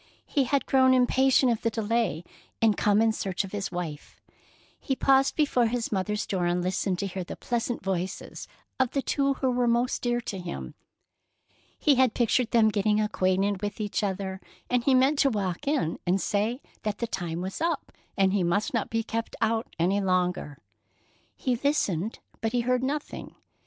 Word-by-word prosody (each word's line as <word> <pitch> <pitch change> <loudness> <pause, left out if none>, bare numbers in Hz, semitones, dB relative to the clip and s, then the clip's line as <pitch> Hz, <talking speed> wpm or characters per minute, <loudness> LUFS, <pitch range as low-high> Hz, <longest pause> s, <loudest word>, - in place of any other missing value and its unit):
He 275 -2 +1
had 280 +2 +1
grown 260 -1 +4
impatient 260 0 +4
of 230 - -1
the 230 - +1
delay, 220 -6 -1 0.4
and 220 -2 +4
come 210 +1 +3
in 225 - +3
search 195 -3 -2
of 195 - -8
his 205 -1 -3
wife. 170 -5 -6 0.6
He 270 - -2
paused 270 +1 +3
before 265 -6 +2
his 235 0 -2
mother's 210 +1 -1
door 180 -3 -1
and 175 0 0
listened 185 0 -1
to 200 - -2
hear 190 -1 -4
the - - -7
pleasant 240 -2 -2
voices 190 -1 -4 0.3
of 260 -2 +1
the 275 - 0
two 275 -1 +1
who 260 -1 0
were 245 0 +1
most 240 +2 +1
dear 240 -1 0
to 195 -4 -5
him. 70 - -6 1.0
He 295 - +4
had 255 -3 +3
pictured 240 0 +2
them 225 -2 +4
getting 210 0 +1
acquainted 195 -1 +1
with 205 +1 -4
each 210 0 -1
other, 190 -1 -3 0.3
and 245 -1 +2
he 265 +1 +4
meant 270 +3 +3
to 275 - +5
walk 200 - -3
in 280 - 0
and 185 +2 +3
say 215 +7 -1 0.2
that 210 -1 -2
the 235 - -2
time 175 -7 -4
was 190 - -5
up 330 -3 -1 0.3
and 195 -1 +3
he 200 - +2
must 180 +7 0
not 230 -4 -1
be 225 0 -1
kept 230 +1 -4
out 225 0 0
any 185 +5 +2
longer. 180 -6 0 0.8
He 255 -3 0
listened, 225 - 0 0.2
but 225 +1 -1
he 245 - +2
heard 250 +1 +1
nothing. 285 +3 -4
220 Hz, 185 wpm, -27 LUFS, 190-250 Hz, 1.0 s, to